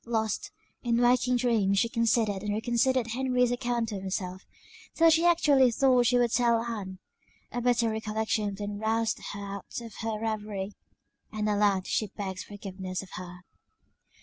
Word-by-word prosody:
Lost, 220 -3 -1 0.3
in 235 -1 +1
waking 250 +1 +3
dreams, 220 -5 +2
she 230 - +3
considered 230 -4 +1
and 210 0 -2
reconsidered 240 +3 +1
Henry's 250 0 +1
account 240 -2 -1
of 200 -2 -4
himself; 185 -1 -4 0.5
till 330 0 +6
she 325 +2 +4
actually 290 -7 +5
thought 250 0 +3
she 245 - +4
would 240 -2 +2
tell 235 -2 +3
Ann 205 -5 -5 0.5
a 245 - -3
bitter 240 -2 +2
recollection 220 -1 -1
then 205 0 -5
roused 225 +1 0
her 205 - -6 0.2
out 200 - -7
of 230 -2 -9
her 225 -1 -2
reverie; 210 -3 -3 0.6
and 215 -1 -2
aloud 205 -2 +2
she 215 - 0
begged 190 -2 -6
forgiveness 190 -2 -6
of 190 - -14
her. 180 0 -8
220 Hz, 155 wpm, -28 LUFS, 205-240 Hz, 0.6 s, till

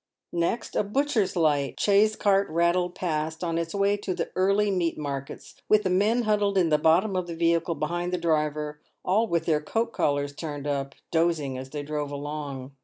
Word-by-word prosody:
Next, 170 +7 -1
a - - +2
butcher's 225 -1 0
light 145 -5 +1
chaise 210 +1 +4
cart 200 -1 +2
rattled 170 +2 +1
past, 160 -1 -2
on 165 -1 -1
its 165 +3 -4
way 200 +1 +2
to 195 -3 -3
the - - -3
early 200 +2 +2
meat 175 -3 0
markets, 140 -2 -6
with 215 0 +5
the 185 - 0
men 215 +6 +2
huddled 205 -2 +1
in 175 -3 +3
the 150 -1 +3
bottom 180 +6 +3
of 180 -1 -1
the 170 - -5
vehicle, 170 0 +1
behind 175 +4 -2
the 180 - 0
driver, 150 -2 -1 0.2
all 210 +5 +2
with 170 -4 0
their 155 -2 +2
coat 225 +9 -2
collars 145 0 0
turned 145 -2 -6
up, 140 -1 -2 0.2
dozing 160 -5 +1
as 130 +1 -7
they 145 +1 -5
drove 150 0 -3
along. 145 -2 -5
170 Hz, 190 wpm, -26 LUFS, 150-195 Hz, 0.2 s, with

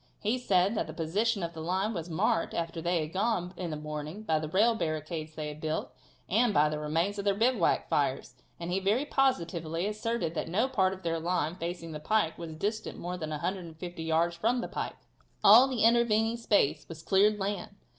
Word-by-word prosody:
He 225 +5 0
said 190 -3 +2
that - - -1
the - - -8
position 200 +6 0
of 170 0 -3
their 160 - -7
line 190 +6 -1
was 170 -2 -5
marked, 165 0 0
after 165 0 -3
they 170 0 +1
had 155 +1 -5
gone 190 -3 0
in 175 -1 -4
the 155 - -3
morning, 150 +6 -6
by 160 -6 +1
the 155 -1 -4
rail 215 +7 +4
barricades 155 -4 -3
they 150 -1 -4
had 150 +1 -9
built, 155 0 -2 0.4
and 220 +2 +2
by 150 +1 +5
the 150 0 -3
remains 165 +7 -1
of 200 - -4
their 200 -1 +3
bivouac 245 +5 +2
fires, - - 0 0.3
and 170 +1 -4
he 190 - +1
very 210 +9 +1
positively 170 - 0
asserted 215 -4 -2
that 165 - -3
no 215 +9 +2
part 190 -7 +1
of 190 - -10
their 165 -1 -1
line, 165 -1 0
facing 170 -1 -5
the 150 - -5
pike, 165 0 +1
was 165 -2 -6
distant 215 +6 -3
more 180 +1 -4
than 160 -4 -5
150 170 +1 -5
yards 165 +1 +1
from 235 +7 +1
the - - -4
pike. - - -4 0.5
All 230 +6 +9
the 250 -5 -1
intervening 230 -1 +3
space 165 -10 +1
was 165 -1 -9
cleared 205 +2 +4
land. 200 -2 -3
180 Hz, 205 wpm, -30 LUFS, 160-215 Hz, 0.5 s, All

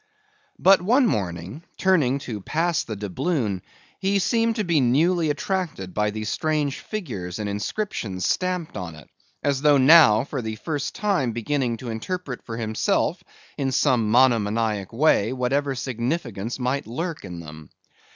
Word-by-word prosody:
But 195 0 +5
one 245 +9 +4
morning, 95 - -3
turning 155 -9 +3
to 110 -4 -5
pass 165 - 0
the 110 - -6
doubloon, 105 - -2 0.4
he 195 +1 +1
seemed 230 +3 +1
to 215 - 0
be 170 -6 +2
newly 160 +7 +2
attracted 150 - -2
by 105 0 +1
the 110 +1 -4
strange 150 +4 -1
figures 110 - -5
and 105 -1 -3
inscriptions 100 - -3
stamped 180 -3 -1
on 90 -5 -6
it, 80 - -14 0.4
as 140 -2 +1
though 145 -1 +5
now 130 -6 +7
for 135 -1 -4
the 110 -1 -4
first 145 +4 -4
time 190 - 0
beginning 120 +1 -1
to 120 0 -6
interpret 140 +3 -4
for 115 - -6
himself 110 -1 0 0.4
in 135 -1 0
some 120 -4 +2
monomaniac 110 -4 +2
way 120 -3 +3
whatever 135 +2 0
significance 120 - -3
might 130 +1 -2
lurk 160 +7 -4
in 90 -3 -7
them. 75 -2 -11
130 Hz, 150 wpm, -24 LUFS, 110-165 Hz, 0.4 s, now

